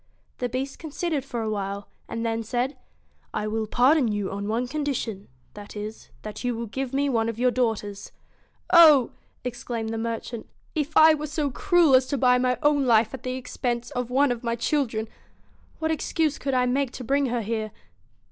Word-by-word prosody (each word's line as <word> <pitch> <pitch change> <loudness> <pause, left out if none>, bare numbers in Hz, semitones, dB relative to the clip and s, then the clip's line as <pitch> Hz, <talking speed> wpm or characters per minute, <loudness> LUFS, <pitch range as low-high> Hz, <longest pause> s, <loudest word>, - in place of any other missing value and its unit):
The 245 - -1
Beast 265 +3 -4
considered 315 -2 -2
for 240 -4 -4
a 220 - -2
while, 200 -1 -4 0.2
and 230 0 -3
then 225 0 -1
said 245 +5 -2 0.3
* - - -39
I 210 - -1
will 220 0 -2
pardon 255 +4 +4
you 205 -2 -2
on 200 +1 -4
one 235 +3 -1
condition, 260 -8 -3 0.3
that 205 0 -10
is, 210 +1 -7
that 215 - -7
you 245 -1 0
will 230 +1 -4
give 260 +4 -4
me 280 +1 +1
one 230 -4 +1
of 230 - -5
your 250 +1 +3
daughters.' 210 -5 -2 0.3
' - - -14
Oh! 290 -6 +6 0.2
' - - -40
exclaimed 240 -2 -4
the 225 - -3
merchant 230 0 -4
' - - -37
If 305 -1 -1
I 315 0 +8
were 305 0 -3
so 300 -1 -1
cruel 350 -4 +3
as 255 0 +5
to 280 - -1
buy 250 -1 +4
my 250 0 +1
own 290 -2 +3
life 225 -1 +4
at 265 - -6
the 255 0 -3
expense 245 -2 -3
of 245 -1 -3
one 270 +2 +3
of 240 0 -4
my 235 -1 0
children, 235 -3 -1 0.7
what 320 0 -1
excuse 315 -1 0
could 275 -2 -1
I 250 0 +3
make 265 +2 +1
to 255 - -7
bring 275 +3 +1
her 240 -1 -1
here?' 220 0 -2
245 Hz, 205 wpm, -25 LUFS, 225-275 Hz, 0.7 s, I